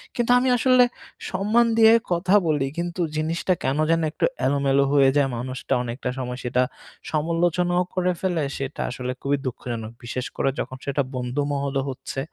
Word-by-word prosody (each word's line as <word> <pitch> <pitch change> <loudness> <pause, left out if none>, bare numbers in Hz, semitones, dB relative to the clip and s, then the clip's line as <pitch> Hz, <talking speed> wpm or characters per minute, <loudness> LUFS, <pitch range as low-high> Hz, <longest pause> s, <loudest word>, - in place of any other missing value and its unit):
কিন্তু 240 0 +1
আমি 255 +1 +1
আসলে 255 +1 +5 0.5
সম্মান 210 +5 +3
দিয়ে 225 0 +7 0.2
কথা 180 +3 +2
বলি 145 -3 +1
কিন্তু 175 +1 -3 0.2
জিনিসটা 165 +4 0
কেনো 145 +4 +1
যেন 165 0 +3
একটু - - 0 0.2
এলোমেলো 140 0 +2
হয়ে 135 -2 +6
যায়। 135 -2 +3
মানুষটা 130 +1 -3
অনেকটা 125 +1 -4
সময় 125 -1 -4 0.7
সমালোচনাও 175 +3 +1
করে 180 0 +2
ফেলে 175 -5 0
সেটা 135 +1 -4
আসলে 125 0 -4
খুবই 140 +1 +1
দুঃখজনক। 115 -3 -5
বিশেষ 125 +1 -4
করে 135 - +1
যখন 130 - -4
সেটা 140 0 0
বন্ধুমহলও 140 +2 -1
হচ্ছে। 135 +1 -6
145 Hz, 150 wpm, -24 LUFS, 130-175 Hz, 0.7 s, দিয়ে